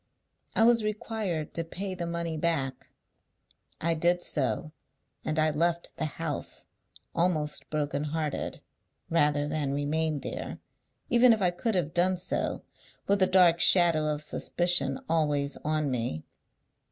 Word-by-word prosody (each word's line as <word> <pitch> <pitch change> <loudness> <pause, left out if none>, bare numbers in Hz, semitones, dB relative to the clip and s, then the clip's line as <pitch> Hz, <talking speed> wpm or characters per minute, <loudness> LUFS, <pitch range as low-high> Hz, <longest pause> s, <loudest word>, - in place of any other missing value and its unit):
I 225 - +4
was 230 -1 +4
required 210 -6 -3
to 165 - -2
pay 190 +4 -5
the 175 -2 -4
money 170 -1 -3
back. 150 -5 -1 0.9
I 165 +1 +1
did 175 +2 +1
so; 150 +2 0 0.5
and 155 +1 -2
I 155 0 +3
left 170 +3 -1
the - - -1
house, 155 0 -4 0.5
almost 165 -4 -1
broken 150 -1 -2
hearted, 150 -1 -3 0.5
rather 150 -3 +2
than 150 -2 -2
remain 150 +1 -1
there, - - -5 0.5
even 240 0 +6
if 220 - -2
I 180 - +3
could 210 +5 -2
have 165 -4 0
done 180 +1 +2
so, 180 - -2 0.4
with 200 0 +1
a 185 - +6
dark 180 -3 +5
shadow 170 -4 +4
of 150 0 -3
suspicion 155 -6 +3
always 145 -3 +1
on 155 -2 -1
me. 115 -11 -3
160 Hz, 140 wpm, -28 LUFS, 150-175 Hz, 0.9 s, even